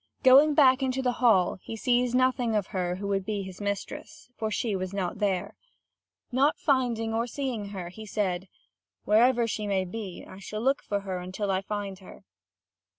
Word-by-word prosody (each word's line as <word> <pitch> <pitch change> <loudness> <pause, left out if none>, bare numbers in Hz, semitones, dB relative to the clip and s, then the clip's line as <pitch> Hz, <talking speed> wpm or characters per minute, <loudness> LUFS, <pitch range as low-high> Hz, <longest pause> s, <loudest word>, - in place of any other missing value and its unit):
Going 280 +4 +7
back 265 -2 +6
into 265 0 -1
the 250 - +2
hall, 190 -8 +4
he 225 - -7
sees 245 +1 +1
nothing 250 -3 +2
of 205 -3 +1
her 180 -2 -1
who 200 +2 -5
would 195 -1 0
be 205 0 -3
his 190 +1 -9
mistress; 200 +4 -5
for 220 - -2
she 215 0 -1
was 185 +1 -4
not 190 0 -2
there. 195 -4 -1 0.8
Not 275 +5 +3
finding 240 -5 +1
or 230 +2 0
seeing 245 -4 -3
her, 185 -4 -6
he 215 +4 -10
said: 190 -3 -1 0.6
"Wherever 235 +3 +4
she 215 -2 -3
may 190 -2 0
be, 190 -1 -7
I 185 - -11
shall 215 +2 -6
look 270 +3 +2
for 200 -1 -2
her 190 -2 -4
until 185 +3 -3
I 190 0 +1
find 200 -1 -5
her." 190 - -14
210 Hz, 185 wpm, -27 LUFS, 190-245 Hz, 0.8 s, Going